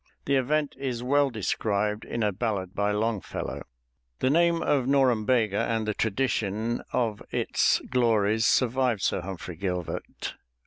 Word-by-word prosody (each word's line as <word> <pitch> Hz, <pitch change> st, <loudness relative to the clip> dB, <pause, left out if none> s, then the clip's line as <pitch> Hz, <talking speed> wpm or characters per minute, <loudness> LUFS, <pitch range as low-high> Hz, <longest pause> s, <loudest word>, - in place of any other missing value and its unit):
The 140 Hz, -, +2 dB
event 145 Hz, +3 st, +1 dB
is 125 Hz, -3 st, -3 dB
well 140 Hz, +2 st, +3 dB
described 105 Hz, -1 st, -1 dB
in 115 Hz, -, -2 dB
a 105 Hz, -, +2 dB
ballad 95 Hz, -3 st, -2 dB
by 100 Hz, 0 st, 0 dB
Longfellow. 105 Hz, 0 st, -2 dB, 0.6 s
The 130 Hz, -, +1 dB
name 170 Hz, +1 st, +3 dB
of 135 Hz, -4 st, +1 dB
Norumbega 120 Hz, -5 st, +2 dB
and 110 Hz, -1 st, -1 dB
the 105 Hz, -, +1 dB
tradition 110 Hz, 0 st, -1 dB
of 110 Hz, -4 st, 0 dB
its -, -, +2 dB
glories 110 Hz, -3 st, +3 dB
survived 125 Hz, -4 st, +2 dB
Sir -, -, +1 dB
Humphrey 90 Hz, -2 st, -7 dB
Gilbert. 90 Hz, -2 st, -4 dB
115 Hz, 135 wpm, -27 LUFS, 105-130 Hz, 0.6 s, well